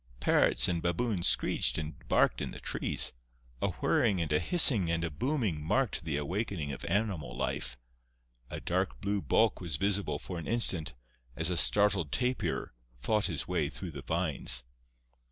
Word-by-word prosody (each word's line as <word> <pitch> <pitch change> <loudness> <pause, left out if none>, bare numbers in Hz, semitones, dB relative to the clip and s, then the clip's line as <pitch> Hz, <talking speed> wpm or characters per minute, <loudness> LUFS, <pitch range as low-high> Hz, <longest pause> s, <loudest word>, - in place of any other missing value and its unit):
Parrots - - +3
and 85 -2 -1
baboons 85 +2 0
screeched - - +3
and 75 -1 -4
barked - - +2
in - - -3
the - - -9
trees; - - 0 0.5
a - - +1
whirring 100 -5 0
and 80 -3 -2
a 75 - +3
hissing 125 - +6
and 85 0 -1
a 85 - -3
booming 105 - -2
marked 105 - -1
the 75 -3 -2
awakening 85 0 -3
of 65 - -8
animal 90 - -2
life; 65 -1 -3 0.7
a - - -6
dark 95 +2 -2
blue 100 0 -2
bulk 110 0 +1
was 85 -6 -1
visible 95 -5 -1
for 90 +3 -7
an 80 - -8
instant, 95 - +1 0.4
as 80 +4 0
a - - 0
startled 100 -3 +3
tapir 125 - -2 0.3
fought 105 - 0
his 85 -7 -4
way - - -1
through 90 -3 -8
the 70 -2 -8
vines. 70 -4 +1
85 Hz, 165 wpm, -30 LUFS, 75-105 Hz, 0.7 s, hissing